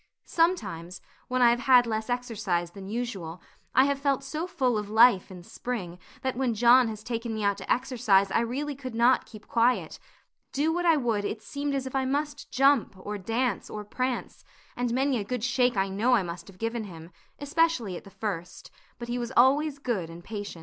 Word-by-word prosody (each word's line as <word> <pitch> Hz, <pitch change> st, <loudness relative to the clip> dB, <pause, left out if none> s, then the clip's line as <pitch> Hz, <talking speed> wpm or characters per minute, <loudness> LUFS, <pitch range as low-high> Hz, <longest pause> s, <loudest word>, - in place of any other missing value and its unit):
Sometimes, 190 Hz, -, 0 dB, 0.3 s
when 255 Hz, 0 st, +1 dB
I 235 Hz, -, +7 dB
have 240 Hz, -, +1 dB
had 250 Hz, -1 st, +5 dB
less 220 Hz, 0 st, -3 dB
exercise 215 Hz, -8 st, -2 dB
than 195 Hz, +1 st, -10 dB
usual, 200 Hz, -7 st, -4 dB, 0.4 s
I 260 Hz, +2 st, +6 dB
have 280 Hz, -1 st, 0 dB
felt 275 Hz, -1 st, 0 dB
so 310 Hz, +5 st, -4 dB
full 265 Hz, -10 st, 0 dB
of 210 Hz, -1 st, -6 dB
life 220 Hz, -3 st, +5 dB
and 180 Hz, -2 st, -11 dB
spring 185 Hz, -9 st, -5 dB, 0.2 s
that 260 Hz, -1 st, -1 dB
when 250 Hz, -3 st, 0 dB
John 240 Hz, +2 st, +6 dB
has 215 Hz, -1 st, -6 dB
taken 230 Hz, -1 st, -3 dB
me 215 Hz, -, -3 dB
out 200 Hz, -1 st, +1 dB
to -, -, -5 dB
exercise 215 Hz, -6 st, +2 dB
I -, -, +3 dB
really 265 Hz, +6 st, -2 dB
could 260 Hz, -3 st, -8 dB
not 240 Hz, +3 st, +3 dB
keep 215 Hz, -1 st, -13 dB
quiet; 240 Hz, +2 st, +1 dB, 0.5 s
do 305 Hz, +4 st, +1 dB
what 350 Hz, +1 st, 0 dB
I 325 Hz, -2 st, +5 dB
would, 230 Hz, -6 st, 0 dB
it 215 Hz, +1 st, -4 dB
seemed 285 Hz, 0 st, -3 dB
as 270 Hz, -1 st, -2 dB
if 260 Hz, -, -6 dB
I 265 Hz, -1 st, 0 dB
must 290 Hz, +2 st, -2 dB
jump, 275 Hz, -5 st, +3 dB
or 205 Hz, +2 st, -6 dB
dance, 230 Hz, +6 st, -1 dB
or 210 Hz, -1 st, -6 dB
prance, 255 Hz, +4 st, -3 dB, 0.3 s
and 245 Hz, -1 st, -1 dB
many 265 Hz, 0 st, +1 dB
a -, -, -2 dB
good 245 Hz, +2 st, -4 dB
shake 250 Hz, -2 st, +2 dB
I 195 Hz, 0 st, +2 dB
know 215 Hz, +6 st, +2 dB
I 210 Hz, -, +2 dB
must 170 Hz, -1 st, -7 dB
have 195 Hz, -2 st, -14 dB
given 230 Hz, +1 st, -3 dB
him, 165 Hz, -3 st, -11 dB, 0.3 s
especially 285 Hz, -, 0 dB
at -, -, -8 dB
the -, -, -13 dB
first; 185 Hz, -4 st, -6 dB, 0.3 s
but 235 Hz, -, -7 dB
he 240 Hz, +1 st, -2 dB
was 240 Hz, -1 st, -4 dB
always 280 Hz, +4 st, +4 dB
good 230 Hz, -, -2 dB
and 170 Hz, +1 st, -10 dB
patient. 205 Hz, -5 st, -6 dB
235 Hz, 205 wpm, -27 LUFS, 205-260 Hz, 0.5 s, I